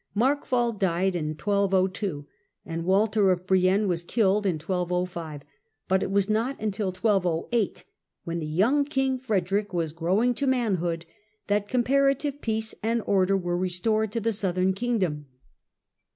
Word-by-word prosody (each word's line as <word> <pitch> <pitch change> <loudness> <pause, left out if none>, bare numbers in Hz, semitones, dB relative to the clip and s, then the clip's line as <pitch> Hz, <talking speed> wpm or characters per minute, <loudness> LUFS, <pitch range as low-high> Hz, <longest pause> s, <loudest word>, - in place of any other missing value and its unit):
Markwald 240 -2 +1
died 185 0 +1
in 155 -2 -2
1202 195 -4 0 0.4
and 165 0 -4
Walter 200 +1 +3
of 180 0 -1
Brienne 190 +2 +3
was 175 -2 0
killed 200 +2 +1
in 180 - +1
1205, 175 -2 -3 0.4
but 190 0 +2
it - - -2
was 195 0 +2
not 230 +6 0 0.2
till 205 -1 -2
1208, 185 +2 0 0.4
when 170 0 -3
the 155 - -4
young 220 - +2
king 270 -2 0
Frederick 200 -4 -1
was 165 -3 -1
growing 190 +9 +1
to 280 +3 -2
manhood, 180 -10 0 0.4
that 205 0 0
compara 275 +2 +3
tive 285 0 -4
peace 220 -1 -2
and 225 +1 0
order 195 0 +3
were 175 -2 -2
restored 190 +4 0
to 230 - -1
the 225 +1 0
southern 190 -2 +1
king 240 +4 -1
dom. 150 -7 -2
195 Hz, 150 wpm, -26 LUFS, 180-225 Hz, 0.4 s, Walter